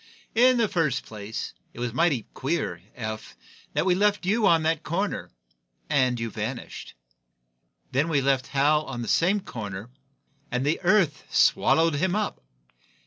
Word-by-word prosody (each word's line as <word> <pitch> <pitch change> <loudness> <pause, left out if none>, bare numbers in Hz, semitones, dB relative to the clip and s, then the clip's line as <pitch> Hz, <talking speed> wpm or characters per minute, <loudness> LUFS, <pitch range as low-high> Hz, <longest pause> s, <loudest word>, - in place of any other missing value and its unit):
"In 250 +2 +5
the 230 -2 +3
first 165 -9 0
place, 110 0 -6 0.2
it - - -9
was 120 -2 -2
mighty 150 -5 +2
queer, 160 +6 -2
Eph, 110 -3 -6 0.4
that - - +1
we 185 - +4
left 205 +1 +2
you 210 +2 +3
on 165 -3 +4
that 160 0 +1
corner 190 +6 -2 0.6
and 130 -4 +2
you 115 -1 -3
vanished. 110 +5 -6 1.0
Then 145 +6 +1
we 150 -3 +2
left 135 -1 +1
Hal 150 +2 +2
on 120 -3 -5
that - - -6
same 195 +5 +3
corner 105 - -7 0.6
and 125 +1 -1
the 150 +3 +1
earth 180 -6 +2
swallowed 165 0 +4
him 185 +4 +1
up. 210 -1 -2
150 Hz, 150 wpm, -26 LUFS, 125-180 Hz, 1.0 s, In